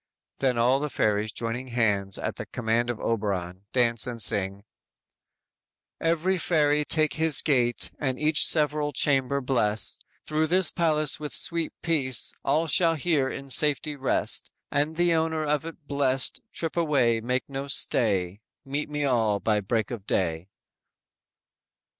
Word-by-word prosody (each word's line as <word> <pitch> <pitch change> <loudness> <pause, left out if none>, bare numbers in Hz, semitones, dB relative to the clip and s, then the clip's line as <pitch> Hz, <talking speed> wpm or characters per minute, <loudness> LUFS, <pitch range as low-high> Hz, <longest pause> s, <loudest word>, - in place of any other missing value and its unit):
"_ - - -42
Then 130 -3 +1
all 125 +3 +3
the 150 +1 -3
fairies, 105 -3 0
joining 120 +5 -4
hands 105 -5 +1
at - - -4
the - - -6
command 120 +1 -1
of 120 - -3
Oberon, 100 -4 -3
dance 120 -2 +2
and 120 -1 -5
sing: 100 -1 +1 1.4
_"Every 170 +3 0
fairy 150 -3 +2
take 155 -1 +1
his 160 -2 +3
gait, 125 -5 0
And 130 -3 -2
each 150 +1 +3
several 150 -1 +1
chamber 140 0 +1
bless; 115 -5 0 0.3
Through 155 +1 0
this 180 +1 +3
palace 155 -4 +1
with 150 -1 -5
sweet 170 -2 +2
peace, 135 -8 +1
All 155 +4 +1
shall 165 +1 +3
here 150 -3 0
in 135 0 -8
safety 150 +1 +2
rest 135 -1 -1 0.2
And 145 +3 0
the 175 0 +2
owner 160 -1 0
of 150 +1 -1
it 160 -2 -11
blest, 135 -2 0
Trip 165 -2 -3
away, 135 -9 +1
make 125 +2 -2
no 140 0 -5
stay; 100 -8 +1 0.2
Meet 145 +3 -3
me 150 -1 -2
all 110 -6 +1
by 105 -1 0
break 110 +2 -2
of 110 -5 -7
day!" 85 0 -1
135 Hz, 150 wpm, -26 LUFS, 115-155 Hz, 1.4 s, all